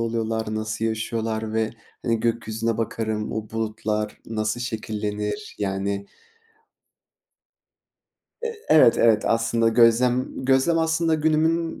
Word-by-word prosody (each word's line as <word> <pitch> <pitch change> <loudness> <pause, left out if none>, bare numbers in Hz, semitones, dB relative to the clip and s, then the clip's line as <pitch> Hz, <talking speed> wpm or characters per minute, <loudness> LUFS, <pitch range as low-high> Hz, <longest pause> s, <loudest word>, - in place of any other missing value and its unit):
oluyorlar, 115 -1 -2
nasıl 110 +1 -3
yaşıyorlar 110 0 -2
ve, 110 0 +1 0.3
hani, 115 -2 +1
gökyüzüne 115 -1 -1
bakarım, 110 -1 -2
o 110 -1 -5
bulutlar 110 -1 -2
nasıl 110 +1 -2
şekillenir. 110 - -4
Yani 100 0 -2 2.4
Eee, 465 -1 -3
evet, 150 -7 +6
evet. 110 -2 +4
Aslında 115 0 +2
gözlem 120 +3 +3
gözlem 135 +6 +3
aslında 160 0 +2
günümün 160 +2 +1
115 Hz, 100 wpm, -24 LUFS, 110-125 Hz, 2.4 s, evet